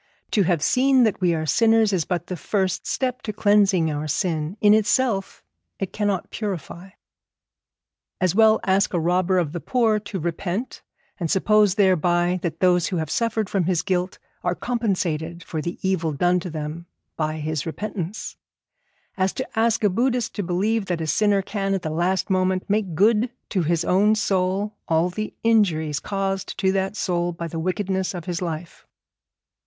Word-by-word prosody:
To 210 - +3
have 170 -4 +1
seen 260 - +4
that 215 -4 +1
we 175 -2 +3
are 155 -1 -2
sinners 225 +3 +3
is 175 -4 +1
but 175 -2 -2
the 185 - -5
first 190 +1 -1
step 255 -1 -1
to 215 - -4
cleansing 200 -5 +3
our 150 +1 -3
sin; 160 +2 -1
in 210 0 +6
itself 220 -1 +1 0.3
it 195 -1 -4
cannot 205 -3 -1
purify. 190 -3 -5 1.3
As 185 -2 +2
well 220 +1 +5
ask 195 0 +2
a - - +2
robber 180 +3 +1
of 170 -5 0
the 175 - -4
poor 225 0 +1
to 200 -2 -6
repent, 175 +7 -3 0.4
and 170 -3 -2
suppose 210 +1 +3
thereby 180 -2 +2
that 165 -2 -4
those 180 -2 +3
who 185 - -3
have 160 -2 -3
suffered 225 -2 0
from 190 -3 0
his 175 -2 +1
guilt 185 -1 -1 0.3
are 175 - 0
compensated 180 -9 -2
for 160 -3 -4
the 170 +3 -4
evil 165 -5 0
done 180 +5 +2
to 180 - -6
them 155 +2 -6 0.3
by 155 0 -2
his 155 0 -3
repentance, 200 +2 -5 0.8
as 190 0 +1
to 260 - -4
ask 225 0 +2
a - - +6
Buddhist 245 +3 0
to - - -3
believe 195 +4 0
that 175 -2 -1
a - - -2
sinner 200 +5 +2
can 195 -1 -1
at 190 - -4
the 155 - -3
last 175 +4 0
moment 185 -1 0
make 205 -5 0
good 220 +6 +3 0.2
to 190 - 0
his 165 0 0
own 205 +4 +3
soul 195 0 0
all 165 +2 +2
the 215 +4 -5
injuries 165 -10 +2
caused 195 0 -3
to 190 -1 +2
that 195 +1 -1
soul 175 -3 -1
by 170 0 -5
the 165 0 -5
wickedness 190 +2 -1
of 175 - -6
his 175 -1 -3
life. 170 -1 -6
185 Hz, 175 wpm, -23 LUFS, 170-210 Hz, 1.3 s, in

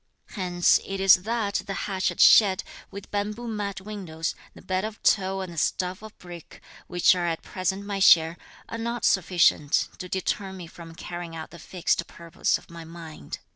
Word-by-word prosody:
Hence 180 -4 +2
it 195 0 -5
is 195 -1 +7
that 205 +1 0
the 195 - -3
thatched 190 -2 -2
shed, 195 -4 +6 0.3
with 200 0 -10
bamboo 210 +3 -3
mat 205 -3 -4
windows, 185 -6 -4 0.2
the - - -13
bed 185 0 -1
of 215 0 -5
tow 195 -1 +2
and 185 -2 -6
the 165 - -3
stove 180 +3 -1
of 215 -1 -12
brick, 175 -2 -12 0.3
which 175 0 +4
are 175 -1 -1
at 165 0 -3
present 190 +2 -3
my 200 -1 -3
share, 165 -3 +6 0.3
are 230 - -6
not 235 +1 -2
sufficient 175 -5 +3
to 180 - -7
deter 190 +1 -2
me 185 -2 -8
from 165 0 -12
carrying 175 -1 -7
out 160 - -8
the 170 - -12
fixed 170 +1 -1
purpose 170 -1 -1
of - - -18
my 170 0 -9
mind. 165 - -9
185 Hz, 180 wpm, -26 LUFS, 170-200 Hz, 0.3 s, is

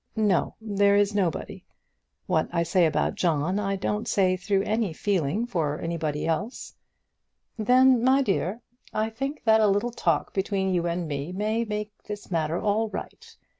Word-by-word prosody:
"No, 210 -5 +1
there 200 -2 +2
is 205 0 +3
nobody. 185 -6 -2 0.6
What - - 0
I 170 - +1
say 170 0 +3
about 150 -1 0
John 170 +3 0
I 195 -1 -1
don't 210 +3 -2
say 185 -2 +2
through 195 +1 0
any 215 -4 -1
feeling 195 +2 0
for 160 -10 -2
anybody 160 -3 -2
else." 190 +9 -3 0.8
"Then, 250 +2 +4
my 265 +2 +4
dear, 200 0 -1 0.3
I 220 +1 0
think 275 +6 -4
that 220 -1 +5
a 215 - +5
little 205 +4 +1
talk 240 - 0
between 190 -1 0
you 175 -1 0
and 170 0 -2
me 145 +2 -4
may 215 +4 -1
make 210 -1 -4
this 205 -2 -8
matter 165 0 0
all 215 +2 0
right. - - -8
200 Hz, 165 wpm, -26 LUFS, 170-220 Hz, 0.8 s, that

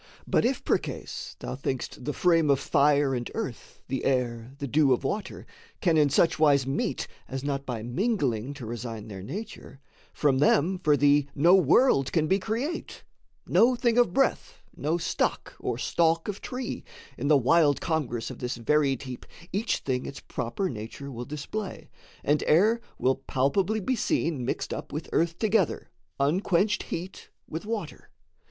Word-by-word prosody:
But - - +2
if - - -1
percase - - -2
Thou - - -5
think'st 130 -1 -4
the 150 - 0
frame 165 -2 +3
of 140 -1 +4
fire 145 -2 +3
and 120 -2 -3
earth, - - -6
the 130 0 -3
air, 125 -1 -1
The 140 - -4
dew 140 0 +4
of 125 - -1
water 205 +10 -3 0.3
can 170 -4 +2
in 150 -2 +4
such 155 +3 +3
wise 140 -4 +4
meet 135 +1 -2 0.2
As 135 0 -5
not 140 -1 -2
by 115 -4 -3
mingling 135 - -1
to 130 -5 -8
resign 115 -1 -6
their 95 -2 -7
nature, 145 - -8 0.3
From 135 -3 +2
them 160 +5 +3
for 150 -5 +3
thee 145 0 +4
no 170 +5 +5
world 175 - +4
can 160 -3 +2
be 190 +5 +2
create 235 - -4 0.4
No 245 +2 +4
thing 235 -1 +1
of 240 -7 +4
breath, 275 - 0
no 160 +3 0
stock 165 -1 -1
or - - -2
stalk 165 -1 +1
of 205 -1 -4
tree: 250 -1 -5 0.3
In 140 - -3
the 150 -1 +6
wild 145 +2 +4
congress 135 -9 -2
of - - -10
this 125 -1 -3
varied 135 +2 +1
heap 130 -2 -7 0.3
Each 210 +5 0
thing 130 -2 -2
its 140 - -7
proper 125 - -3
nature 130 +4 -7
will 120 -1 -6
display, 155 - -6 0.3
And 145 +1 +2
air 215 +9 +4 0.2
will 130 +1 +2
palpably 160 +11 0
be 255 +6 0
seen 165 - 0
mixed - - -2
up - - -6
With 155 +2 -5
earth 165 0 +1
together, 215 -5 +1 0.3
unquenched 185 +7 +2
heat 180 +3 -6 0.2
with 165 +6 -6
water. 215 -8 -5
150 Hz, 165 wpm, -27 LUFS, 130-185 Hz, 0.4 s, the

